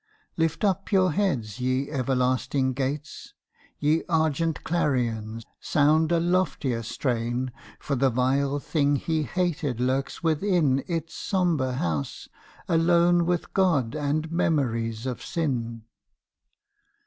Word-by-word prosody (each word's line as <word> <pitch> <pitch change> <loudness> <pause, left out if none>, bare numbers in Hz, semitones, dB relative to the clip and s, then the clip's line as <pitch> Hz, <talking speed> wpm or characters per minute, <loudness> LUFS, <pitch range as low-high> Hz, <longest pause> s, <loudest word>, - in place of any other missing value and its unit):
Lift 165 +1 0
up 195 0 0
your 185 -3 +4
heads 135 - -1
ye 130 +3 -1
everlasting 130 0 0
gates! 140 +3 -4 0.4
Ye 150 +2 +2
argent 160 0 +1
clarions, 115 -9 -1 0.2
sound 155 +2 +3
a 170 - +3
loftier 170 -9 0
strain 120 +1 -2 0.3
For 140 - -2
the 135 +1 +3
vile 135 +3 +1
thing 145 0 +1
he 160 +2 -1
hated 155 -6 -1
lurks 130 +5 -1
within 160 -4 +2
Its 165 -2 -3
sombre 170 -9 0
house, 80 - -3 0.4
alone 170 +1 +3
with 175 -1 -1
God 160 -12 +2
and 155 +2 -1
memories 120 -9 0
of 125 -2 -3
sin. 120 -8 -2
145 Hz, 115 wpm, -26 LUFS, 125-165 Hz, 0.4 s, your